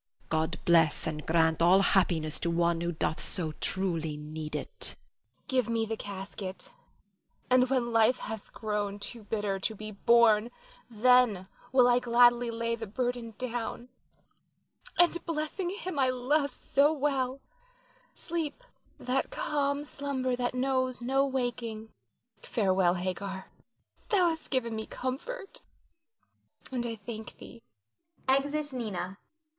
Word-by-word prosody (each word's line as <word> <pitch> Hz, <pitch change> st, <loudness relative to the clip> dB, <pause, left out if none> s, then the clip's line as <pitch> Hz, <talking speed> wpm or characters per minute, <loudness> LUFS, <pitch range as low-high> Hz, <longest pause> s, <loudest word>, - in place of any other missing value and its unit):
God 160 Hz, +2 st, 0 dB
bless 165 Hz, -3 st, +4 dB
and 155 Hz, -1 st, -4 dB
grant 160 Hz, 0 st, +3 dB
all 180 Hz, +3 st, +6 dB
happiness 170 Hz, -6 st, +2 dB
to 170 Hz, -, 0 dB
one 170 Hz, 0 st, +1 dB
who 170 Hz, 0 st, -1 dB
doth 160 Hz, -1 st, -2 dB
so 165 Hz, -4 st, -2 dB
truly 165 Hz, -5 st, -1 dB
need 150 Hz, +1 st, -6 dB
it. -, -, -3 dB
Nina. -, -, -40 dB
Give 255 Hz, -5 st, +1 dB
me 225 Hz, -1 st, +1 dB
the 225 Hz, 0 st, -3 dB
casket; 195 Hz, -2 st, -7 dB, 0.8 s
and 255 Hz, 0 st, +5 dB
when 245 Hz, -3 st, 0 dB
life 225 Hz, +3 st, +5 dB
hath 220 Hz, -1 st, -7 dB
grown 210 Hz, -2 st, -2 dB
too 230 Hz, +3 st, -5 dB
bitter 205 Hz, -2 st, -2 dB
to 220 Hz, +3 st, -2 dB
be 215 Hz, +1 st, -7 dB
borne 230 Hz, +1 st, +4 dB, 0.4 s
then 235 Hz, -4 st, +4 dB, 0.2 s
will 250 Hz, -1 st, +6 dB
I 245 Hz, 0 st, +5 dB
gladly 240 Hz, 0 st, +4 dB
lay 230 Hz, 0 st, -1 dB
the 225 Hz, -1 st, -6 dB
burden 240 Hz, 0 st, -3 dB
down, 240 Hz, 0 st, -4 dB, 1.1 s
and 345 Hz, -1 st, +4 dB
blessing 330 Hz, +3 st, -2 dB
him 370 Hz, -6 st, -4 dB
I 260 Hz, -1 st, +4 dB
love 265 Hz, +3 st, +1 dB
so 285 Hz, +2 st, +3 dB
well 275 Hz, -3 st, 0 dB, 0.8 s
sleep 335 Hz, +6 st, -4 dB, 0.3 s
that 255 Hz, +2 st, -1 dB
calm 290 Hz, -, -1 dB
slumber 275 Hz, -3 st, -2 dB
that 245 Hz, 0 st, -2 dB
knows 255 Hz, -1 st, 0 dB
no 265 Hz, +3 st, +1 dB
awaking. 245 Hz, -5 st, -2 dB, 0.5 s
Farewell, 185 Hz, -4 st, +2 dB
Hagar, 190 Hz, +1 st, -4 dB, 0.6 s
thou 370 Hz, -5 st, +4 dB
hast 320 Hz, -1 st, -4 dB
given 235 Hz, -4 st, 0 dB
me 220 Hz, 0 st, -4 dB
comfort 395 Hz, -, -5 dB, 1.1 s
and 245 Hz, -2 st, -2 dB
I 230 Hz, -, -3 dB
thank 220 Hz, +1 st, -8 dB
thee. 235 Hz, -, -12 dB, 0.7 s
[Exit 285 Hz, +2 st, +1 dB
Nina. 200 Hz, -6 st, -4 dB
235 Hz, 130 wpm, -30 LUFS, 195-260 Hz, 1.1 s, all